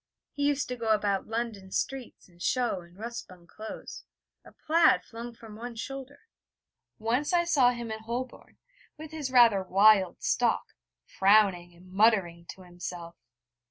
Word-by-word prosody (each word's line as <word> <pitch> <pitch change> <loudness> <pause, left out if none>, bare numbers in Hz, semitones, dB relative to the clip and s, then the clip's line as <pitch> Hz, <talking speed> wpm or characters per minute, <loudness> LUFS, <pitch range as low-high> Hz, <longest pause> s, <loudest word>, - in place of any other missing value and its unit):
He 285 0 0
used 290 -1 0
to 250 - -3
go 230 -2 -5
about 205 -3 +1
London 225 -4 -4
streets 265 +5 -4
in 175 -2 -23
shough 240 +1 0
and 170 +1 -19
rough 230 +3 -6
spun 180 -6 -10
clothes, 215 +5 -9 0.4
a - - -15
plaid 325 +1 +3
flung 235 +1 -9
from 225 -2 -12
one 235 +2 -7
shoulder. 270 +4 -7 0.8
Once 245 +8 -1
I 345 -1 +4
saw 285 -8 +4
him 240 -2 -4
in 220 - -4
Holborn 240 +3 -6 0.4
with 310 0 -9
his 305 -4 -4
rather 235 -6 +6
wild 195 0 +4
stalk, - - +1 0.4
frowning 190 -3 +3
and 180 +2 -18
muttering 190 -5 +2
to 190 - -10
himself. 175 -1 -8
220 Hz, 155 wpm, -28 LUFS, 190-250 Hz, 0.8 s, rather